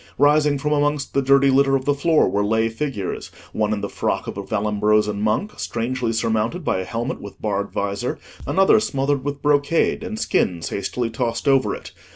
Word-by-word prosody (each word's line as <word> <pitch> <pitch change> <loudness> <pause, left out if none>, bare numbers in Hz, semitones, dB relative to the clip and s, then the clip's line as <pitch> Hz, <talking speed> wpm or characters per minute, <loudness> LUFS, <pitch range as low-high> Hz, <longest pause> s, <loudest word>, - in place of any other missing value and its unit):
Rising 145 0 +4
from 150 +2 -2
amongst 145 -1 0
the 140 - +2
dirty 140 0 +4
litter 135 +1 +4
of 130 -1 -1
the 145 - +3
floor 155 +3 +3
were 100 0 0
lay 110 +2 +1
figures: 115 -5 -4 0.2
one 105 -1 0
in 105 -1 -1
the - - -2
frock - - -2
of - - -6
a - - -4
Vallombrosan 105 0 +1
monk, 110 - -1
strangely 120 0 -2
surmounted 115 +8 -1
by - - +1
a 95 - -4
helmet 115 +5 -4
with 100 - -10
barred 100 -1 -2
visor, 100 0 -2 0.3
another 195 +3 +4
smothered 140 -9 -1
with 145 0 -4
brocade 145 +6 +2
and 225 -1 -5
skins 85 - 0
hastily 115 +4 -3
tossed 115 +2 -2
over 135 -1 +3
it. - - -10
130 Hz, 190 wpm, -22 LUFS, 105-145 Hz, 0.3 s, Rising